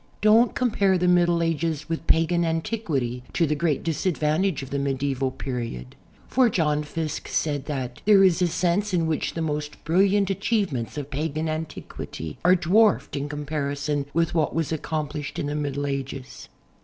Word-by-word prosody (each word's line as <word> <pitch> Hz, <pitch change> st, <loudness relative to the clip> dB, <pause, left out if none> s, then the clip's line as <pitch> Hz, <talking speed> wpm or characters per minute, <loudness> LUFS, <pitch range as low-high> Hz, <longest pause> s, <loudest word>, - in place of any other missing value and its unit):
Don't 220 Hz, +3 st, +5 dB
comj)are 200 Hz, -6 st, +2 dB
the 180 Hz, -, +1 dB
Middle 175 Hz, -1 st, +3 dB
Ages 160 Hz, -2 st, -1 dB
with 165 Hz, 0 st, -4 dB
pagan 165 Hz, +1 st, +3 dB
anticinity 160 Hz, -, -1 dB, 0.2 s
lo 170 Hz, -, +5 dB
the 150 Hz, -, 0 dB
great 150 Hz, -1 st, 0 dB
disadvantage 160 Hz, 0 st, 0 dB
of 135 Hz, -, -10 dB
the 140 Hz, -, -1 dB
medieval 135 Hz, -1 st, -1 dB
period, 120 Hz, -, -5 dB, 0.3 s
for 255 Hz, -2 st, +3 dB
John 150 Hz, -6 st, +1 dB
Fiske 155 Hz, 0 st, -4 dB
said 145 Hz, -3 st, -1 dB
that 130 Hz, -5 st, -4 dB
There 200 Hz, -2 st, +7 dB
is 185 Hz, -2 st, +4 dB
a 180 Hz, -, +4 dB
sense 180 Hz, +4 st, 0 dB
in 165 Hz, -2 st, +2 dB
which 160 Hz, -1 st, -1 dB
the 165 Hz, -, -1 dB
most 150 Hz, -1 st, -4 dB
brilliant 195 Hz, +4 st, +3 dB
achievements 195 Hz, -, -1 dB
of 145 Hz, -2 st, -4 dB
i)agan 155 Hz, +2 st, -2 dB
antiquity 155 Hz, -, -6 dB
are 180 Hz, +1 st, +6 dB
dwarfed 205 Hz, +5 st, +3 dB
in 145 Hz, +1 st, -3 dB
com 150 Hz, 0 st, -5 dB
parison 145 Hz, -1 st, -2 dB
with 165 Hz, +2 st, +1 dB
what 155 Hz, -4 st, +1 dB
was 165 Hz, -2 st, -1 dB
accomi)lished 150 Hz, -2 st, -3 dB
in -, -, -2 dB
the 145 Hz, -, -2 dB
Middle 145 Hz, -1 st, -2 dB
Ages." 135 Hz, -1 st, -5 dB
155 Hz, 170 wpm, -25 LUFS, 140-175 Hz, 0.3 s, There